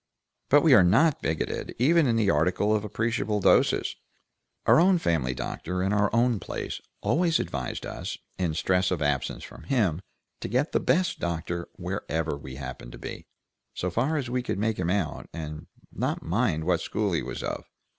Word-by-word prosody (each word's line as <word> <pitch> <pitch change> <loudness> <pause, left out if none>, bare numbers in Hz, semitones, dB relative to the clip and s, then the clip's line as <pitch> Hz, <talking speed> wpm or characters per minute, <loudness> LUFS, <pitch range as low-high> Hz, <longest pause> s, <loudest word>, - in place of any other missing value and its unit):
"But 145 +1 +6
we 160 -5 +6
are 105 - +8
not 130 - +4
bigoted, 80 -1 -2
even 155 +5 +4
in 115 - +2
the 105 -3 +3
article 90 +7 +2
of 105 - -1
appreciable 110 0 -1
doses. - - +3 0.7
Our - - +6
own 185 +2 +5
family 75 - 0
doctor 90 +7 -3
in 95 +2 +1
our 105 -1 +3
old 115 -2 +2
place - - -5 0.2
always 170 0 +2
advised 65 -3 -4
us, - - -5 0.2
in 85 -4 0
stress 90 +3 +2
of 85 -5 -1
absence 75 -3 -1
from - - -11
him, 100 - +1 0.4
to - - -4
get 130 - 0
the - - +2
best 180 0 +1
doctor 85 0 -3
wherever 80 -1 -3
we 65 -2 -9
happened 65 -3 -7
to - - -9
be, - - -8 0.5
so 90 - -2
far 135 - +1
as 135 -4 -2
we 125 +1 -1
could 120 - -3
make 110 0 0
him 85 -1 0
out, 95 -5 -1
and 80 0 -6 0.3
not - - -2
mind 85 -3 0
what 85 0 +1
school 105 +2 -1
he 85 - +1
was - - -5
of. - - -4
95 Hz, 185 wpm, -27 LUFS, 80-120 Hz, 0.7 s, are